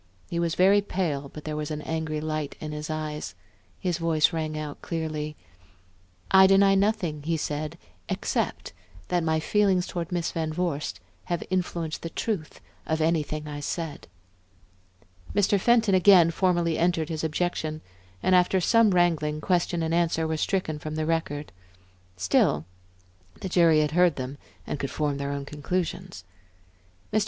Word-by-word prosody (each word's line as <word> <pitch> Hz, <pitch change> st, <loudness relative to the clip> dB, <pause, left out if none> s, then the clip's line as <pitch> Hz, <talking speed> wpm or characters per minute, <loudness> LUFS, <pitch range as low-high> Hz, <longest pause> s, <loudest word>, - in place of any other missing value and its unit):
He 170 Hz, -, -1 dB
was 170 Hz, 0 st, 0 dB
very 195 Hz, +3 st, +5 dB
pale, 160 Hz, -8 st, -2 dB
but 150 Hz, -, -10 dB
there 155 Hz, -1 st, -4 dB
was 150 Hz, -1 st, -3 dB
an 150 Hz, -1 st, -4 dB
angry 160 Hz, -1 st, -2 dB
light 155 Hz, -1 st, -3 dB
in 155 Hz, -, -5 dB
his 150 Hz, 0 st, -5 dB
eyes; 150 Hz, -10 st, -4 dB, 0.4 s
his 180 Hz, -2 st, -1 dB
voice 165 Hz, -2 st, +2 dB
rang 155 Hz, -1 st, -2 dB
out 150 Hz, -1 st, -6 dB
clearly. 155 Hz, -2 st, -3 dB, 1.0 s
"I 190 Hz, 0 st, +8 dB
deny 195 Hz, 0 st, +5 dB
nothing," 195 Hz, -6 st, +1 dB
he 165 Hz, +2 st, -1 dB
said, 150 Hz, 0 st, -3 dB, 0.3 s
"except -, -, -2 dB, 0.4 s
that 175 Hz, -1 st, +1 dB
my 160 Hz, -1 st, +1 dB
feelings 190 Hz, +1 st, +2 dB
toward 170 Hz, -1 st, -5 dB
Miss 175 Hz, -1 st, -1 dB
Van 160 Hz, -1 st, -2 dB
Vorst 155 Hz, -3 st, -2 dB, 0.3 s
have 175 Hz, -1 st, -2 dB
influenced 175 Hz, -3 st, -2 dB
the 165 Hz, -, -4 dB
truth 175 Hz, -3 st, -4 dB, 0.3 s
of 160 Hz, 0 st, 0 dB
anything 155 Hz, -2 st, 0 dB
I 145 Hz, -1 st, -5 dB
said." 160 Hz, +1 st, -4 dB, 1.3 s
Mr. 205 Hz, 0 st, +3 dB
Fenton 230 Hz, -1 st, +3 dB
again 185 Hz, -3 st, +6 dB
formally 175 Hz, -2 st, +1 dB
entered 170 Hz, -2 st, +1 dB
his 160 Hz, -1 st, -3 dB
objection, 155 Hz, -1 st, -2 dB, 0.4 s
and 185 Hz, -, +3 dB
after 180 Hz, +1 st, +4 dB
some 230 Hz, +4 st, +4 dB
wrangling, 165 Hz, -5 st, +2 dB
question 175 Hz, 0 st, 0 dB
and 160 Hz, 0 st, -1 dB
answer 165 Hz, -1 st, +1 dB
were 160 Hz, -, -1 dB
stricken 155 Hz, -3 st, -1 dB
from 155 Hz, +1 st, -5 dB
the 155 Hz, 0 st, -1 dB
record. 155 Hz, -4 st, -2 dB, 0.7 s
Still, 90 Hz, -4 st, +2 dB, 0.8 s
the 190 Hz, -, -3 dB
jury 165 Hz, -3 st, +5 dB
had 150 Hz, -1 st, 0 dB
heard 175 Hz, -1 st, +4 dB
them 130 Hz, +2 st, -5 dB, 0.3 s
and 145 Hz, -, -4 dB
could 140 Hz, -, -2 dB
form 145 Hz, -2 st, -1 dB
their 140 Hz, 0 st, -3 dB
own 140 Hz, -1 st, -4 dB
conclusions. 175 Hz, -, -3 dB, 0.9 s
Mr. 215 Hz, -, +4 dB
160 Hz, 155 wpm, -26 LUFS, 150-180 Hz, 1.3 s, I